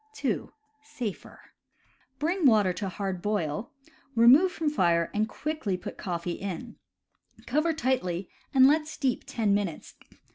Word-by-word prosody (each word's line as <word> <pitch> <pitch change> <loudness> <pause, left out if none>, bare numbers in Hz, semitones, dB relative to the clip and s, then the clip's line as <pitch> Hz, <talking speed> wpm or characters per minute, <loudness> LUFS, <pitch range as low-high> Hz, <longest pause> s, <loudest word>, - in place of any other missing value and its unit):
(2) 270 - -2 0.3
(Safer.) 235 -8 -7 0.8
Bring 335 +2 +2
water 210 -6 +4
to 195 +1 -4
hard 190 -1 -4
boil, 205 -2 -2 0.5
remove 260 +11 +7
from 325 -2 -3
fire 170 - +2
and 215 +1 0
quickly 300 -9 -3
put 180 - -8
coffee 175 -2 -3
in. 200 +4 -5 0.7
Cover 305 +6 +1
tightly 200 - -1 0.2
and 260 -2 +6
let 305 +2 +3
steep 270 -5 -2
ten 215 -4 +1
minutes. 200 -6 -2
220 Hz, 130 wpm, -28 LUFS, 185-290 Hz, 0.8 s, remove